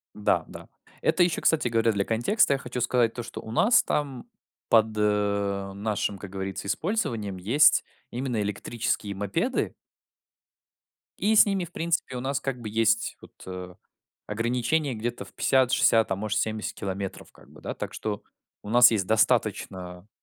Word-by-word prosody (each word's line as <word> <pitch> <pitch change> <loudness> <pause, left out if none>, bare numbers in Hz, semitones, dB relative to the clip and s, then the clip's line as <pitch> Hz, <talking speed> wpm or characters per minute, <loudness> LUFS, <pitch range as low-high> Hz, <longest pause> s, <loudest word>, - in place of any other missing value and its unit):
Да 105 - +1
да, - - -11 0.3
это 180 - +3
ещё, 175 -2 0
кстати 160 -6 +2
говоря, 115 -1 +2
для 100 -2 0
контекста 120 - +2
я - - +1
хочу 125 0 -5
сказать 120 -1 +2
то, 120 - -5
что 115 - -8
у 110 - -9
нас 225 - +4
там 140 - -2 0.4
под, 110 -1 +5
э, 100 -2 0
нашим, 100 0 -2
как 100 0 -9
говорится, 95 0 -5
использованием 115 - -2
есть 120 +12 +4 0.3
именно 125 -3 -2
электрические 105 0 -2
мопеды 105 - -1 1.5
и 220 +2 +2
с - - +8
ними, 195 -3 -1
в 170 - -15
принципе, 165 -6 -2
у - - -4
нас 135 +1 -1
как 135 -2 -4
бы 110 - -5
есть, 110 +1 +1
вот, - - -15
э, 90 -1 -7 0.5
ограничение 125 +6 0
где-то 120 +2 -4
в - - -17
50-60, 125 -4 +3
а - - +2
может, 105 +2 -1
70 110 -1 -2
километров 95 -1 -5
как - - -20
бы, - - -16
да. - - -4
Так - - -6
что 105 -2 -4 0.4
у 105 - -8
нас 120 +2 +7
есть 100 -5 +1
достаточно 100 -5 0
115 Hz, 165 wpm, -26 LUFS, 100-130 Hz, 1.5 s, с